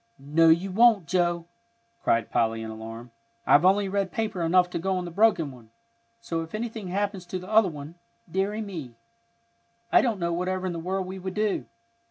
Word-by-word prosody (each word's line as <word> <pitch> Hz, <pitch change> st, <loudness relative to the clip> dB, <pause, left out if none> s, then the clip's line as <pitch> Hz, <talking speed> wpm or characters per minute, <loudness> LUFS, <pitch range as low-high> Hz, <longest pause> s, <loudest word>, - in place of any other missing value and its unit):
"No, 155 Hz, +4 st, +3 dB
you 175 Hz, +4 st, +3 dB
won't, 220 Hz, -2 st, +5 dB
Joe," 175 Hz, -1 st, 0 dB, 0.6 s
cried 115 Hz, 0 st, +1 dB
Polly, 115 Hz, 0 st, +1 dB
in 110 Hz, -, -6 dB
alarm. 115 Hz, +2 st, -9 dB, 0.3 s
"I've 145 Hz, -, +5 dB
only 195 Hz, +2 st, +4 dB
red 195 Hz, -1 st, -1 dB
paper 220 Hz, -6 st, -2 dB
enough 180 Hz, +2 st, +4 dB
to -, -, -2 dB
go 190 Hz, +2 st, 0 dB
on 180 Hz, -, -3 dB
the 175 Hz, -, -6 dB
broken 170 Hz, -6 st, +3 dB
one, 120 Hz, -4 st, -15 dB, 0.5 s
so 165 Hz, -8 st, -3 dB
if 165 Hz, +4 st, -7 dB
anything 225 Hz, -2 st, -4 dB
happens 195 Hz, 0 st, -2 dB
to 185 Hz, -, -3 dB
the 185 Hz, 0 st, -9 dB
other 215 Hz, -2 st, +4 dB
one, 150 Hz, 0 st, -8 dB, 0.3 s
deary 195 Hz, +5 st, -1 dB
me! 165 Hz, -, -7 dB, 1.0 s
I -, -, +6 dB
don't 225 Hz, -6 st, 0 dB
know 170 Hz, -1 st, -1 dB
whatever 185 Hz, +2 st, -2 dB
in 180 Hz, -, -2 dB
the 170 Hz, -, -4 dB
world 185 Hz, +3 st, -2 dB
we 190 Hz, +1 st, -7 dB
could 185 Hz, 0 st, -6 dB
do. 210 Hz, -1 st, 0 dB
185 Hz, 195 wpm, -26 LUFS, 165-195 Hz, 1.0 s, I